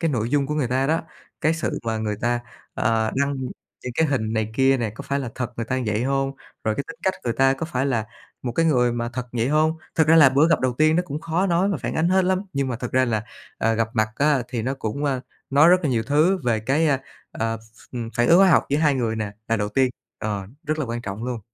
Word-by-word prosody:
cái 165 - +1
nội 115 -4 -1
dung 140 -1 +2
của 150 - -2
người 145 -5 0
ta 130 +2 +1
đó, 160 +3 +1 0.4
cái 155 +1 +2
sự 165 - -2
mà 115 -1 -1
người 105 -1 -2
ta, 120 0 0 0.3
ờ, 110 0 +1
đăng 140 +1 +1 0.5
những 125 - -5
cái 160 - +3
hình 115 -6 -1
này 110 -1 -1
kia 135 +1 +4
nè, 115 -4 -2
có 110 - -9
phải 140 - -1
là 130 -4 -4
thật 125 -2 -4
người 115 - -2
ta 130 - -1
như - - -2
vậy 105 +1 0
hông? 135 0 0 0.3
Rồi 110 -1 +1
cái 140 - -3
tính 235 - -8
cách 190 - +1
người 120 - 0
ta 135 +2 +3
có 145 +4 -4
phải 135 -4 -1
là 115 -5 0 0.4
một 120 - -3
cái 165 +6 +2
người 125 -6 +3
mà 120 0 -2
thật 125 0 -4
vậy 120 +1 0
hông? 155 +2 +2 0.2
Thật 160 -2 +3
ra 165 - +6
là 150 -4 +8
bữa 140 +5 +3
gặp 165 - +3
đầu 130 -1 +1
tiên 155 +1 +4
nó 175 - +2
cũng 150 +2 -4
khó 170 +4 0
nói 180 +2 +2
mà 195 - 0
phản - - -4
ánh 160 +2 +2
hết 190 0 +3
lắm. 185 0 +1
Nhưng 140 -1 -1
mà 125 - -2
thực 125 0 -6
ra 130 0 +4
là, 110 -4 -1 0.3
ờ, 115 0 +2
gặp 115 0 0
mặt 110 -2 +2
á 145 -3 +3
thì 120 -3 -3
nó 130 +3 -1
cũng, 135 +2 -4
ơ, 135 -3 0 0.3
nói 145 +4 +6
rất 180 - +7
là 155 - 0
nhiều 115 -2 +1
thứ 155 - +3
về 115 -3 +1
cái, 135 +8 +1
ơ, 140 -3 +2 0.3
ờ, 115 0 -2
ph 110 +3 -15 0.2
phản 120 0 +2
ứng 170 - +7
hóa 195 -1 +6
học 160 - +4
giữa 145 - +1
2 150 -2 +3
người 115 -4 -1
nè, 110 -2 -3 0.2
là 115 - +2
đầu 105 0 -1
tiên, 130 +4 +2 0.3
ờ, 100 -3 -3 0.2
rất 155 +1 -1
là 155 - 0
quan 120 0 -4
trọng 105 +1 -5
luôn. 125 -3 -3
130 Hz, 280 wpm, -23 LUFS, 115-150 Hz, 0.5 s, là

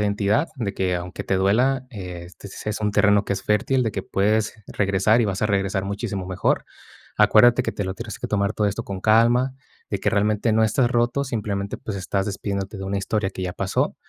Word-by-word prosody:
identidad, 105 +7 +1
de 105 -6 -3
que, 90 -2 0
aunque 90 +1 -6
te 95 - +1
duela, 125 +8 +2
eh, 90 -6 -7
este 95 +3 -12 0.2
es 105 - -3
un 105 -1 +1
terreno 100 0 +3
que - - -1
es 95 - -3
fértil, 110 +5 +2
de 110 - -1
que 95 - -3
puedes 105 +3 +1
regresar, 100 +3 +2
y - - +3
vas 100 -2 -2
a 105 - +2
regresar 95 -1 0
muchísimo 100 -1 -4
mejor, 95 -1 0 0.5
acuérdate 120 +3 +6
que - - -2
te 100 - -3
lo 95 0 -3
tienes 115 +1 -7
que - - -4
tomar 100 0 0
todo 105 - +1
esto 105 +3 -2
con 100 -4 -6
calma, 120 +5 +3 0.4
de - - -1
que - - 0
realmente 105 +2 +1
no 110 +1 +4
estás 120 +3 +2
roto, 120 +3 +1
simplemente, 105 -5 -3
pues, 105 - -6
estás 95 +1 -1
despidiéndote 100 0 -4
de 95 - -5
una 100 +1 -2
historia 100 +1 -1
que 95 - -6
ya 90 -1 -2
pasó, - - -1
105 Hz, 215 wpm, -23 LUFS, 95-110 Hz, 0.5 s, acuérdate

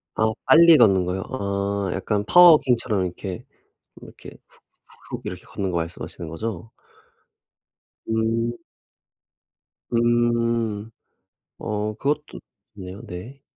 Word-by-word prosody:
아 110 0 +2
빨리 165 0 +7
걷는 95 -6 +4
거요? 90 +2 -3
아 100 -3 -2
약간 105 -2 -1
파워 175 +8 +8
워킹처럼 125 - +2
이렇게, 90 +1 -6 0.6
이렇게 - - -12 0.2
훅 - - -26 0.5
훅훅 - - -5
이렇게 - - -6
걷는 95 -2 -4
거 85 - -1
말씀하시는 85 0 -6
거죠? 110 +4 -6 1.4
음. 115 +1 0 1.4
음. 115 -2 +1 0.7
어 105 0 -3
그것도 150 +5 -3 0.4
좋네요. 95 +1 -9
네. 115 +9 -9
110 Hz, 210 characters per minute, -23 LUFS, 95-120 Hz, 1.4 s, 파워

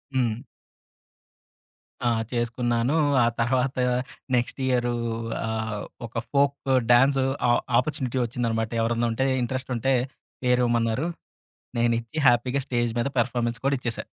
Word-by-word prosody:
హ్మ్. 125 0 0 1.6
ఆ! - - +4 0.2
చేసుకున్నాను. 120 +2 0 0.3
ఆ - - +4
తర్వాత 125 +2 +1 0.6
నెక్స్ట్ 120 +3 -1
ఇయరు 120 -1 +1 0.5
ఆహ్, 110 -2 -3 0.3
ఒక - - -24 0.2
ఫోకు 140 -1 +1 0.2
డాన్సు 135 +2 +5 0.2
ఆహ్, 120 - +3 0.2
ఆపర్చునిటీ 130 -2 -2
వచ్చిందనమాట. 115 -2 -2
ఎవరన్నా 115 +1 +1
ఉంటే, 130 +4 +1 0.2
ఇంట్రెస్టుంటే 130 +1 -1 0.5
పేరేమన్నారు. 125 +2 +2 0.7
నేనిచ్చి 115 +3 0
హ్యాపీగా 125 +3 +3
స్టేజ్ 120 -2 0
మీద 120 - +1
పెర్ఫామన్స్ 120 -1 0
కూడ 140 - +3
ఇచ్చేసా. 120 -3 -3
120 Hz, 105 wpm, -25 LUFS, 115-130 Hz, 1.6 s, డాన్సు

